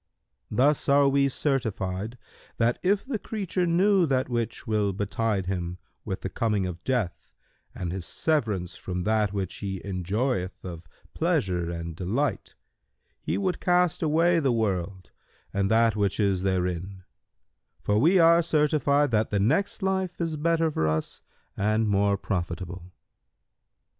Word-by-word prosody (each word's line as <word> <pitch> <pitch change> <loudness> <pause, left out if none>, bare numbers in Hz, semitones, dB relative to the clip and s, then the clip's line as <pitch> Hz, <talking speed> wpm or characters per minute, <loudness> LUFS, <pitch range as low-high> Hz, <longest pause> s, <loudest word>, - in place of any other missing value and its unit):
Thus 140 +7 +2
are 140 0 +5
we 140 0 +3
certified 110 -6 -2 0.4
that, 120 +1 +1
if 195 +2 +1
the 260 -5 -3
creature 190 -5 -2
knew 185 +1 +3
that 130 -2 0
which 120 0 -3
will 105 -3 0
betide 105 0 -1
him 90 -1 -3 0.3
with 95 - -4
the - - -3
coming 105 -4 0
of 90 -1 -6
death[FN#137] 120 -9 0 0.6
and 85 -2 -4
his 90 -2 -4
severance 105 - -1
from 90 -1 -4
that 110 -1 +1
which 100 -2 -3
he 95 -2 -4
enjoyeth 95 +2 -2
of 85 -2 -8 0.3
pleasure 90 -3 0
and 85 -1 -5
delight, 110 - -2 0.7
he - - -2
would 185 -2 -1
cast 180 -2 +2
away 165 +2 +3
the 140 -5 +2
world 95 -5 -2 0.4
and 100 0 +1
that 115 -1 +3
which 100 -1 0
is 100 -3 +2
therein; 95 0 -2 0.8
for 105 +1 +1
we 170 - +5
are 170 0 +6
certified 150 -3 +2
that 110 -1 +1
the 100 - 0
next 160 - +1
life 190 -2 -1
is 165 -2 -1
better 165 +1 +1
for 80 - 0
us 80 0 -2 0.3
and 110 +2 +1
more 100 0 +2
profitable." 90 -1 -4
110 Hz, 145 wpm, -26 LUFS, 95-150 Hz, 0.8 s, are